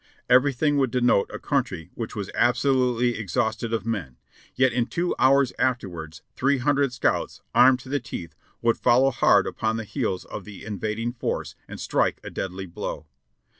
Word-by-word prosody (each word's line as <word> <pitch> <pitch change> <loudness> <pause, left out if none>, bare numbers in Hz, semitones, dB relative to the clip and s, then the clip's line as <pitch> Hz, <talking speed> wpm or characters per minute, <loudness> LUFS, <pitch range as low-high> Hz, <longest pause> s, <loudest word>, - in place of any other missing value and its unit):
Everything 140 +3 +3
would 135 -2 +2
denote 120 -4 +2
a - - -5
country 85 0 -2
which 115 -2 -6
was 100 -2 -4
absolutely 125 -1 +2
ex 100 -7 -6
hausted 110 +1 0
of 115 -1 -1
men, 90 - -3 0.4
yet 130 -1 +3
in 120 -1 0
two 175 +1 -1
hours 135 0 +4
afterwards 90 -11 -2
three 140 +2 +2
hundred 140 +1 +1
scouts, 125 - -1
armed 125 +1 +6
to 130 - -14
the 140 +2 0
teeth, 90 -8 -7 0.3
would 115 0 +2
follow 130 +3 +4
hard - - +4
upon 110 0 -1
the 115 - -3
heels 110 -4 -3
of - - -7
the 105 -2 -11
invad 105 +1 -3
ing 120 +1 -2
force 120 - -3
and - - -9
strike - - 0
a - - -7
deadly 95 0 -4
blow. 85 -2 -6
120 Hz, 175 wpm, -25 LUFS, 105-130 Hz, 0.4 s, armed